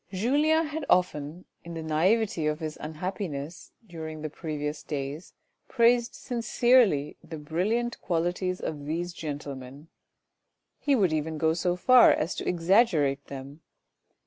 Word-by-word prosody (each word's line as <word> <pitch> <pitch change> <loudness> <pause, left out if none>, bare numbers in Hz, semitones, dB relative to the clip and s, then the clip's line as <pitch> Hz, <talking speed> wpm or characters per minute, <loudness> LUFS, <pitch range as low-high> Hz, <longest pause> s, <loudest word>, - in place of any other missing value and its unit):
Julien 295 - +2
had 305 +1 -4
often 170 -1 +1 0.2
in 170 0 -8
the 165 - -5
naivety 170 +2 +1
of 150 0 -1
his 155 -2 -4
unhappiness, 160 -1 -5
during 160 -4 -7
the 155 - -4
previous 150 -2 -4
days 145 +3 -5 0.3
praised 240 -1 +3
sinctrely 235 - +2
the 160 -1 -8
brilliant 200 +11 -1
qualities 180 +1 -1
of 145 -2 -5
these 170 +3 -3
gentlemen; 145 -2 -7 0.9
he 285 -1 +2
would 190 -9 +2
even 155 +1 -2
go 160 +1 +2
so 175 +1 0
far 250 +7 +7
as 160 - 0
to - - -5
exaggerate 165 - +2
them. 140 +3 -9
165 Hz, 130 wpm, -27 LUFS, 150-200 Hz, 0.9 s, far